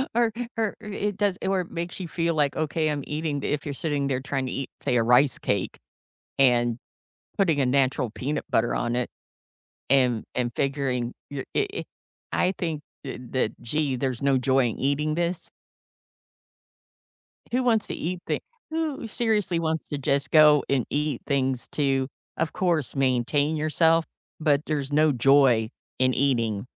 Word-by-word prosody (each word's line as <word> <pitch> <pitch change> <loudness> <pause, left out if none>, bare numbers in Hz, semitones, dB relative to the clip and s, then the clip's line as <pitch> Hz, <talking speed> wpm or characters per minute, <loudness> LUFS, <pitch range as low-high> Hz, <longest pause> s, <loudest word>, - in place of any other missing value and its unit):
Or 235 -1 +3 0.3
or 220 -2 0
i - - -9
it 205 -1 -3
does 205 -3 +1
or 190 -1 +2
it 175 - -9
makes 170 +1 -4
you 175 - -5
feel 165 0 0
like, 145 -2 +1
"Okay, 155 0 0
I'm 145 -2 -2
eating 150 -1 -2
d" - - -3
if 150 - -3
you're 145 - -3
sitting 145 -1 -1
there 130 -2 0
tryna 135 -2 -2
eat, 135 - -4
say, 125 - +1
a 115 - +3
rice 125 +4 +4
cake, 100 -2 -1 0.6
and 120 -3 +3 0.6
putting 165 -8 +3
a 130 - +3
natural 130 -2 +1
peanut 140 +7 -3
butter 115 +1 +2
on 120 +1 -1
it, 125 -1 0 0.8
and 125 -4 +3
and 125 -1 0
figuring 135 -3 -1 0.2
your 140 -2 -4
i 415 - +3
i - - -4 0.5
I 185 +1 +2
think, 160 -4 -2 0.2
eh, 130 - -5
that, 130 -4 +1
"Gee, 140 +2 0
there's 130 -1 -2
no 140 -1 +3
joy 130 +1 +3
in - - -7
eating 145 +3 +1
this" 170 +1 -2 2.0
Who 255 +1 +2
wants 225 -3 +2
to - - -4
eat 180 +2 -3
thi - - -1 0.3
who 315 -6 -3
seriously 210 -6 0
wants 160 -1 -2
to 145 - -3
just 140 -1 0
go 150 -2 +7
and 135 -4 +2
eat 150 0 -1
things 135 -3 0
to, 135 -2 +1 0.3
of 165 0 -1
course, 170 -7 0
maintain 135 +3 +1
yourself, 160 +2 +3 0.3
but 150 -2 +2
there's 145 -2 -2
no 155 +1 +4
joy 125 -3 +4 0.3
in 130 0 +3
eating. 120 -5 +1
145 Hz, 170 wpm, -25 LUFS, 130-165 Hz, 2.0 s, go